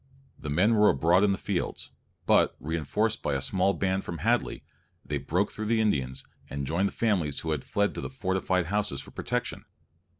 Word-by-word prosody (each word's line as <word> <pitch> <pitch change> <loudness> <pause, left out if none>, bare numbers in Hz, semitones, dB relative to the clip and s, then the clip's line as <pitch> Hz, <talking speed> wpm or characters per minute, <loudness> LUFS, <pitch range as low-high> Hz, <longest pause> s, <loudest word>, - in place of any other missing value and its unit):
The 75 - -6
men 95 +10 +3
were 105 -1 +6
abroad 85 +7 +4
in 105 - +4
the 95 - 0
fields, 100 -4 -3 0.3
but, - - +4
reinforced 85 +9 -1
by 75 - 0
a - - 0
small 95 +7 +1
band 95 0 0
from 85 - -5
Hadley, 115 - 0 0.4
they 70 +1 -2
broke 90 +9 0
through 110 -1 -5
the 115 0 +2
Indians, 70 -12 0 0.3
and 70 0 -3
joined 85 +8 +1
the - - -4
families 90 -11 0
who 80 - -2
had 75 -4 -1
fled 100 0 0
to - - -5
the - - -4
fortified 95 -6 0
houses 100 -6 -1
for - - -13
protection. - - -3
95 Hz, 195 wpm, -28 LUFS, 75-105 Hz, 0.4 s, were